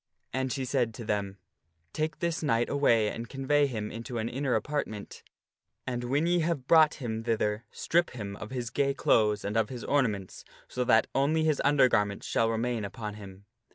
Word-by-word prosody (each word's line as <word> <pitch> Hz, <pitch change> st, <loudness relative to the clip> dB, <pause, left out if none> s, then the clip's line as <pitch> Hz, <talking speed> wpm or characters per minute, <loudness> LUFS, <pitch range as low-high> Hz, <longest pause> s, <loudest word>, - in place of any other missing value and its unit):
And 130 Hz, 0 st, -1 dB
she 135 Hz, -1 st, -2 dB
said 125 Hz, -4 st, 0 dB
to 115 Hz, -, -7 dB
them, 100 Hz, -2 st, -2 dB, 0.3 s
" 80 Hz, 0 st, -46 dB
Take 155 Hz, 0 st, -2 dB
this 170 Hz, -2 st, -1 dB
knight 120 Hz, -6 st, +1 dB
away, 115 Hz, -7 st, +3 dB
and 115 Hz, 0 st, -6 dB
convey 140 Hz, +2 st, +2 dB
him 110 Hz, -5 st, -4 dB
into 115 Hz, +2 st, -6 dB
an 115 Hz, +1 st, -2 dB
inner 135 Hz, 0 st, -1 dB
apartment, 125 Hz, -8 st, -3 dB, 0.6 s
and 120 Hz, -1 st, -3 dB
when 140 Hz, +6 st, +1 dB
ye 175 Hz, +1 st, +2 dB
have 160 Hz, -5 st, -1 dB
brought 155 Hz, 0 st, +6 dB
him 115 Hz, -4 st, -4 dB
thither, 110 Hz, -1 st, -1 dB
strip 175 Hz, +1 st, +1 dB
him 100 Hz, -5 st, -6 dB
of 105 Hz, 0 st, -8 dB
his 120 Hz, -2 st, -4 dB
gay 140 Hz, +2 st, +1 dB
clothes 105 Hz, -5 st, +2 dB
and 105 Hz, +2 st, -3 dB
of 110 Hz, -2 st, +2 dB
his 125 Hz, -2 st, -7 dB
ornaments 105 Hz, -10 st, -1 dB, 0.2 s
so 125 Hz, -, -2 dB
that 115 Hz, -2 st, +5 dB
only 155 Hz, +4 st, +2 dB
his 155 Hz, -2 st, +1 dB
undergarments 120 Hz, -8 st, +3 dB
shall 115 Hz, 0 st, +1 dB
remain 115 Hz, 0 st, -1 dB
upon 105 Hz, +1 st, -5 dB
him. 100 Hz, -1 st, -11 dB
120 Hz, 190 wpm, -29 LUFS, 105-140 Hz, 0.6 s, brought